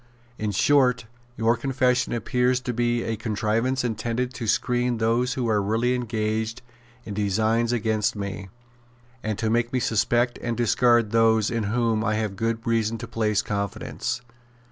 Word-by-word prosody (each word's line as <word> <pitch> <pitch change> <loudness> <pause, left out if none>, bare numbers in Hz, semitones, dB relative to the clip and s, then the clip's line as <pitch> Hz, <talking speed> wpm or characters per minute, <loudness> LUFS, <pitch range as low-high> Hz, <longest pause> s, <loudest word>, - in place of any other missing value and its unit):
In 105 - -1
short 125 +3 +3 0.3
your 115 +1 +3
confession 125 -2 +1
appears 125 +1 +1
to 125 - -3
be 120 0 0
a 115 - -2
contrivance 110 +4 -1
intended 120 +2 -2
to 115 - -5
screen 120 +2 +1
those 120 +3 +1
who 125 -4 -1
are 105 -2 +2
really 115 +5 +1
engaged 110 -1 -2 0.4
in 105 - -5
designs 110 +3 +1
against 110 -1 0
me, 100 -1 -5 0.7
and 110 -2 -3
to 110 -2 -1
make 120 +1 +1
me 130 - +1
suspect 120 +2 +1
and 120 -2 -2
discard 120 -1 +3
those 115 -1 +3
in 115 -3 -1
whom 110 0 +1
I 110 -1 +1
have 110 -2 -2
good 115 +1 -2
reason 115 -1 +1
to - - -7
place 105 -2 0
confidence. 105 +4 -3
115 Hz, 155 wpm, -25 LUFS, 110-120 Hz, 0.7 s, short